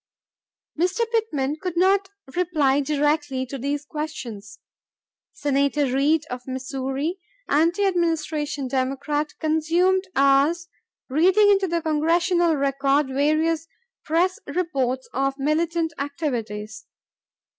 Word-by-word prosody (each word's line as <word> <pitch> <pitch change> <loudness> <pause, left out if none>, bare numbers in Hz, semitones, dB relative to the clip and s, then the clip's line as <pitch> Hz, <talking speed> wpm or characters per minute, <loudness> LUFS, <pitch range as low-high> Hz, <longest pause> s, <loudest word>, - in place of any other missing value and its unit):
Mr. 365 +6 +1
Pittman 305 - 0
did 360 -2 -4
not 385 +2 +3 0.3
reply 310 -6 +2
directly 290 -2 0
to 270 +1 -7
these 285 +3 -2
questions. 265 -10 -6 0.7
Senator 280 +1 +1
Reed 300 +3 +2
of 250 +1 -6
Missouri, 270 +6 -3 0.3
anti 335 +7 +2
Administration 315 -6 -1
Democrat, 275 +4 -2
consumed 335 +5 +2
hours 280 +5 +3 0.4
reading 375 +9 +4
into 390 -1 +3
the 340 -1 -1
Congressional 335 +2 +2
Record 275 0 +1
various 310 +4 +1 0.4
press 350 +4 +1
reports 275 -6 -1
of 275 +1 0
militant 325 +3 0
activities. 230 -8 -4
300 Hz, 100 wpm, -23 LUFS, 275-340 Hz, 0.7 s, reading